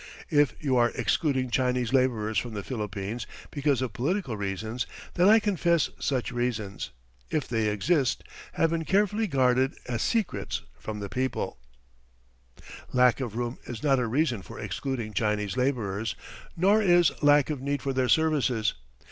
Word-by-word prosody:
If 145 Hz, -4 st, +3 dB
you 135 Hz, -4 st, +1 dB
are 120 Hz, -1 st, +4 dB
excluding 130 Hz, -5 st, 0 dB
Chinese 125 Hz, -1 st, +1 dB
labourers 110 Hz, -5 st, +2 dB
from 120 Hz, -1 st, -6 dB
the 100 Hz, -, -4 dB
Philippines 105 Hz, -1 st, -4 dB, 0.2 s
because 140 Hz, -3 st, +1 dB
of 120 Hz, -5 st, -4 dB
political 145 Hz, -, -1 dB
reasons 105 Hz, +4 st, -3 dB, 0.3 s
then 180 Hz, +2 st, +4 dB
I 220 Hz, -, +8 dB
confess 170 Hz, -6 st, +1 dB
such 130 Hz, -3 st, -1 dB
reasons, 120 Hz, -5 st, -2 dB, 0.4 s
if 150 Hz, -, -1 dB
they 115 Hz, -2 st, 0 dB
exist, 130 Hz, -, +1 dB, 0.3 s
have 165 Hz, -, +2 dB
been 165 Hz, -1 st, 0 dB
carefully 210 Hz, +6 st, +2 dB
guarded 130 Hz, -3 st, +2 dB
as 120 Hz, -1 st, -2 dB
secrets 175 Hz, -, -1 dB, 0.2 s
from 105 Hz, -1 st, -5 dB
the 100 Hz, -, -3 dB
public. 130 Hz, +5 st, -2 dB, 1.4 s
"Lack 125 Hz, 0 st, +4 dB
of 120 Hz, -5 st, -4 dB
room 120 Hz, +1 st, -3 dB
is 120 Hz, -3 st, -7 dB
not 135 Hz, -3 st, +3 dB
a 125 Hz, -, 0 dB
reason 125 Hz, -3 st, +1 dB
for 90 Hz, -, -11 dB
excluding 120 Hz, -6 st, -4 dB
Chinese 105 Hz, -1 st, 0 dB
labourers, 115 Hz, -5 st, -1 dB, 0.4 s
nor 200 Hz, +5 st, +4 dB
is 175 Hz, -5 st, +5 dB
lack 145 Hz, 0 st, +5 dB
of 145 Hz, -4 st, -4 dB
need 140 Hz, 0 st, -2 dB
for 135 Hz, -, -1 dB
their 130 Hz, -1 st, +1 dB
services. 140 Hz, -9 st, +2 dB
125 Hz, 155 wpm, -27 LUFS, 110-145 Hz, 1.4 s, I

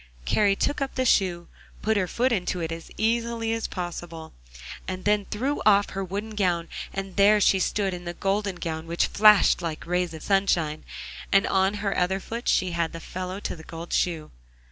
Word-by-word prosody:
Kari 205 Hz, -2 st, +3 dB
took 285 Hz, -, -1 dB
up 275 Hz, -, -2 dB
the 260 Hz, -, 0 dB
shoe, 180 Hz, -7 st, +2 dB, 0.4 s
put 220 Hz, +1 st, +2 dB
her 190 Hz, -3 st, +1 dB
foot 250 Hz, +7 st, +1 dB
into 185 Hz, -4 st, -1 dB
it 165 Hz, -1 st, -3 dB
as 165 Hz, 0 st, -7 dB
easily 230 Hz, 0 st, 0 dB
as 225 Hz, -1 st, -2 dB
possible, 175 Hz, -3 st, -6 dB, 0.5 s
and 185 Hz, 0 st, -5 dB
then 210 Hz, -1 st, +2 dB
threw 260 Hz, +9 st, -2 dB
off 205 Hz, -1 st, +4 dB
her 195 Hz, -, -3 dB
wooden 200 Hz, +4 st, -4 dB
gown, 180 Hz, -5 st, 0 dB, 0.2 s
and 195 Hz, -1 st, -6 dB
there 205 Hz, +1 st, +6 dB
she 195 Hz, -1 st, +4 dB
stood 195 Hz, 0 st, 0 dB
in 175 Hz, 0 st, -7 dB
the 175 Hz, 0 st, -5 dB
golden 195 Hz, 0 st, -1 dB
gown 160 Hz, -2 st, -5 dB
which 170 Hz, +1 st, +1 dB
flashed 210 Hz, -3 st, +5 dB
like 165 Hz, -2 st, -4 dB
rays 180 Hz, -1 st, -1 dB
of 160 Hz, -, -9 dB
sunshine, 175 Hz, -6 st, +1 dB, 0.5 s
and 195 Hz, 0 st, +5 dB
on 190 Hz, +1 st, +2 dB
her 200 Hz, -, 0 dB
other 185 Hz, +2 st, +1 dB
foot 230 Hz, +5 st, -6 dB
she 185 Hz, -1 st, +2 dB
had 170 Hz, -1 st, -1 dB
the 165 Hz, -, -6 dB
fellow 185 Hz, +3 st, -5 dB
to -, -, -4 dB
the 160 Hz, -, -12 dB
gold 165 Hz, +1 st, -8 dB
shoe. 165 Hz, -4 st, 0 dB
190 Hz, 195 wpm, -25 LUFS, 175-210 Hz, 0.5 s, there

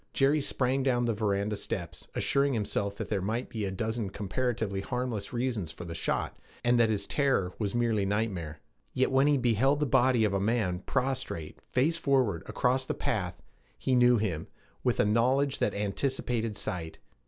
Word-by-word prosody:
Jerry 140 Hz, +2 st, +3 dB
sprang 135 Hz, -1 st, 0 dB
down 125 Hz, -2 st, +2 dB
the 115 Hz, -, +1 dB
veranda 105 Hz, 0 st, 0 dB
steps, 90 Hz, -5 st, -5 dB
assuring 140 Hz, 0 st, +2 dB
himself 100 Hz, -2 st, -1 dB
that -, -, -5 dB
there 100 Hz, -3 st, 0 dB
might 110 Hz, +6 st, -2 dB
be 110 Hz, -3 st, -3 dB
a 95 Hz, -, -2 dB
dozen 110 Hz, +1 st, -2 dB
comparatively 105 Hz, 0 st, -2 dB
harmless 125 Hz, -3 st, -3 dB
reasons 120 Hz, -9 st, -2 dB
for 90 Hz, -, -9 dB
the 85 Hz, -, -6 dB
shot, 85 Hz, -, -2 dB, 0.3 s
and 120 Hz, 0 st, +3 dB
that 115 Hz, -1 st, +5 dB
his 105 Hz, -2 st, 0 dB
terror 135 Hz, -11 st, +1 dB
was 105 Hz, 0 st, -1 dB
merely 115 Hz, -4 st, +2 dB
nightmare. 95 Hz, -7 st, -2 dB, 0.3 s
Yet 130 Hz, -, +2 dB
when 135 Hz, +2 st, +4 dB
he 145 Hz, -1 st, +4 dB
beheld 125 Hz, +3 st, +2 dB
the 150 Hz, -, +2 dB
body 130 Hz, -3 st, +3 dB
of 105 Hz, -2 st, +2 dB
a 100 Hz, -, +1 dB
man 100 Hz, -4 st, 0 dB
prostrate, 125 Hz, -, -2 dB
face 150 Hz, +7 st, +2 dB
forward, 130 Hz, -, +2 dB
across 130 Hz, +1 st, +1 dB
the -, -, -1 dB
path, 90 Hz, -7 st, -2 dB, 0.3 s
he 130 Hz, -, 0 dB
knew 125 Hz, -1 st, +6 dB
him, 90 Hz, -8 st, -2 dB, 0.4 s
with -, -, +1 dB
a -, -, +5 dB
knowledge 130 Hz, +6 st, +2 dB
that -, -, +1 dB
anticipated 115 Hz, +1 st, -1 dB
sight. 80 Hz, -3 st, -4 dB
115 Hz, 175 wpm, -29 LUFS, 100-130 Hz, 0.4 s, knew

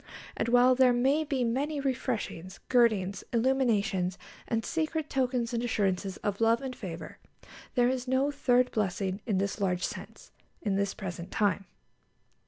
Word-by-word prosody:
And -, -, -1 dB
while 245 Hz, +2 st, +6 dB
there 255 Hz, -1 st, +5 dB
may 270 Hz, +6 st, +2 dB
be 275 Hz, -4 st, -1 dB
many 280 Hz, +6 st, -1 dB
refreshings, 240 Hz, -9 st, -3 dB
girdings, 215 Hz, -6 st, +2 dB
illuminations, 225 Hz, -7 st, +1 dB, 0.3 s
and 225 Hz, -1 st, -1 dB
secret 315 Hz, -1 st, -2 dB
tokens 250 Hz, -3 st, 0 dB
and 235 Hz, -, 0 dB
assurances 195 Hz, -4 st, 0 dB
of 205 Hz, +1 st, -2 dB
love 230 Hz, +1 st, +4 dB
and 265 Hz, -2 st, -5 dB
favour, 175 Hz, -7 st, -7 dB, 0.6 s
there 245 Hz, -1 st, +4 dB
is 255 Hz, 0 st, -1 dB
no 265 Hz, +3 st, +2 dB
third 250 Hz, -3 st, +2 dB
blessing 195 Hz, -1 st, -1 dB
in 205 Hz, -4 st, +1 dB
this 200 Hz, +2 st, -2 dB
large 180 Hz, -1 st, 0 dB
sense, -, -, -8 dB, 0.3 s
in 205 Hz, -, 0 dB
this 200 Hz, 0 st, 0 dB
present 175 Hz, -1 st, -6 dB
time. 200 Hz, -2 st, 0 dB
235 Hz, 150 wpm, -29 LUFS, 195-260 Hz, 0.6 s, while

